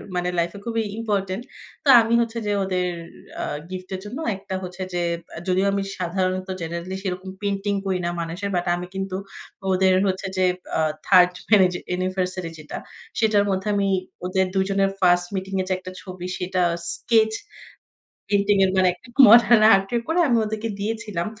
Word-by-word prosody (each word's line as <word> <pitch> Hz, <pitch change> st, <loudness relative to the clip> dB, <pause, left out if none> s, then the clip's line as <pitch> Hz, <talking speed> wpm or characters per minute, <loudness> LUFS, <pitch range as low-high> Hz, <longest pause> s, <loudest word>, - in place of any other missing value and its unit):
মানে 180 Hz, 0 st, 0 dB
লাইফ 170 Hz, 0 st, 0 dB
এ -, -, -9 dB
খুবই 230 Hz, -1 st, -1 dB
ইম্পোর্টেন্ট। 205 Hz, -1 st, -2 dB, 0.4 s
তো -, -, -7 dB
আমি 225 Hz, +1 st, 0 dB
হচ্ছে 230 Hz, 0 st, -3 dB
যে, 205 Hz, -, 0 dB
ওদের 185 Hz, -1 st, 0 dB, 0.5 s
আ -, -, -2 dB, 0.3 s
গিফট 185 Hz, 0 st, -7 dB
এর -, -, -5 dB
জন্য 210 Hz, +5 st, -6 dB, 0.2 s
একটা 190 Hz, 0 st, -6 dB
হচ্ছে 180 Hz, +1 st, -7 dB
যে, 175 Hz, -, 0 dB, 0.3 s
আ -, -, -6 dB
যদিও 185 Hz, +1 st, +2 dB
আমি 200 Hz, -, 0 dB, 0.2 s
সাধারণত 185 Hz, +1 st, -1 dB
জেনারেলি 170 Hz, +3 st, -4 dB
সেরকম 185 Hz, 0 st, -4 dB
পেইন্টিং 200 Hz, 0 st, -1 dB
করি 190 Hz, -1 st, 0 dB
না 175 Hz, -, 0 dB
মানুষের। 170 Hz, +5 st, -4 dB
বাট 175 Hz, -, 0 dB
আমি 175 Hz, 0 st, -5 dB
কিন্তু 195 Hz, -1 st, -3 dB, 0.6 s
ওদের 185 Hz, 0 st, +4 dB
হচ্ছে 190 Hz, +1 st, -2 dB
যে, 185 Hz, -, +3 dB, 0.3 s
আ -, -, +1 dB, 0.3 s
3rd 180 Hz, -2 st, +6 dB, 0.2 s
অ্যানি 205 Hz, -4 st, +7 dB, 0.2 s
অ্যানিভার্সারি 185 Hz, -1 st, -2 dB
যেটা, 150 Hz, -, -7 dB, 0.4 s
সেটার 215 Hz, -2 st, +3 dB
মধ্যে 190 Hz, +1 st, -1 dB
আমি 200 Hz, -1 st, +1 dB, 0.4 s
ওদের 190 Hz, +1 st, +1 dB
২ 190 Hz, -, +3 dB
জনের 195 Hz, 0 st, +2 dB
ফার্স্ট 175 Hz, -1 st, +4 dB
মিটিং 190 Hz, 0 st, -4 dB
এর 185 Hz, -, -3 dB
যে 185 Hz, -, +2 dB
একটা 185 Hz, 0 st, -9 dB
ছবি, 185 Hz, -1 st, -8 dB
সেটা 185 Hz, 0 st, -1 dB, 0.3 s
স্কেচ 220 Hz, -2 st, +2 dB, 1.0 s
পেইন্টিং 200 Hz, 0 st, +3 dB
এর 190 Hz, -, +2 dB
মানে, 185 Hz, -1 st, +4 dB
একটা 180 Hz, +8 st, -19 dB, 0.2 s
মডার্ন 235 Hz, 0 st, +7 dB
আর্ট 195 Hz, 0 st, +1 dB, 0.2 s
করে, 325 Hz, +2 st, +1 dB
আমি 240 Hz, -, +3 dB
ওদেরকে 220 Hz, +1 st, -3 dB
দিয়েছিলাম। 210 Hz, -4 st, -3 dB
190 Hz, 175 wpm, -23 LUFS, 185-205 Hz, 1.0 s, অ্যানি